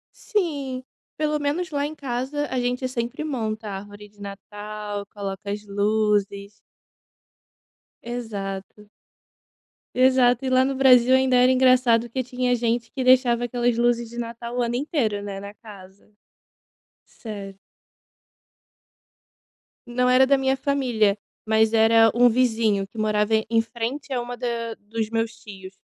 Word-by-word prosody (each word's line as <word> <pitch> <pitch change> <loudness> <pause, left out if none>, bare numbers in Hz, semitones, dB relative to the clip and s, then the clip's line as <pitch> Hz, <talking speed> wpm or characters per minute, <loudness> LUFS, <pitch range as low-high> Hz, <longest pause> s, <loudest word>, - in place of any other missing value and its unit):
Sim, 285 -10 -2 0.3
pelo 300 0 0
menos 315 +4 -1
lá 285 -1 -1
em 305 - -6
casa 275 +1 -3
a 255 - -1
gente 250 +1 -1
sempre 245 +3 -4
monta 220 -7 -3
árvore 205 +1 -9
de 205 0 -23
Natal, 205 +1 -7
coloca 200 -1 -6
as 210 +1 -5
luzes. 205 -1 0 1.5
Exato. 210 -4 -6 1.1
Exato, 255 -1 +4
e - - 0
lá 255 0 +4
no 270 +1 -1
Brasil 255 -1 +5
ainda 260 -1 +3
era 250 +1 +5
engraçado 255 -2 +4
que 260 +3 -2
tinha 250 0 0
gente 235 -1 -1
que 260 - -4
deixava 250 -2 +4
aquelas 240 0 0
luzes 235 0 +1
de 235 - -12
natal 235 0 -6
o 250 - +1
ano 235 0 -1
inteiro 250 -7 -1
né, 200 -1 -6
na 200 +1 -8
casa. 200 -3 -15 0.9
Sério. 200 -3 -9 2.3
Não 250 +1 0
era 255 +1 +6
da 275 0 +4
minha 265 0 +1
família, 245 -7 +1 0.3
mas 220 0 +2
era 225 0 +5
um 245 +1 +6
vizinho 225 -4 +1
que 200 - -20
morava 215 0 +1 0.2
em 225 -1 +4
frente 235 +5 -5
a 250 - 0
uma 245 0 -6
da 235 -2 -3
dos 220 +1 -4
meus 225 0 -1
tios. 195 -3 -11
235 Hz, 140 wpm, -23 LUFS, 210-255 Hz, 2.3 s, era